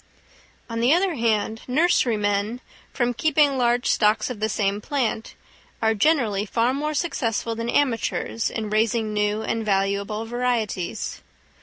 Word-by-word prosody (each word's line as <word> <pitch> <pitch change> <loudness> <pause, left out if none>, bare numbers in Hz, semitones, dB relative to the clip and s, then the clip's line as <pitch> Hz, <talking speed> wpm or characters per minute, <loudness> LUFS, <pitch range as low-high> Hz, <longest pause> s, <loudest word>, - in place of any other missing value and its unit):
On 230 -1 -4
the 240 +3 +3
other 370 0 +1
hand, 225 -3 0
nurserymen, 230 - +1 0.3
from 245 -2 0
keeping 290 +1 +2
large 245 -1 +1
stocks 215 +2 +2
of 230 - -7
the 215 +1 0
same 205 -1 -1
plant, 240 -4 -2 0.4
are 220 0 +2
generally 220 -4 +2
far 230 +4 +1
more 300 +2 -2
successful 230 - -1
than 230 +1 -4
amateurs 230 -3 0
in 215 -2 -4
raising 220 0 +1
new 210 +1 0
and 225 0 -2
valuable 200 +1 0
varieties. 235 -6 -2
225 Hz, 135 wpm, -23 LUFS, 210-250 Hz, 0.4 s, the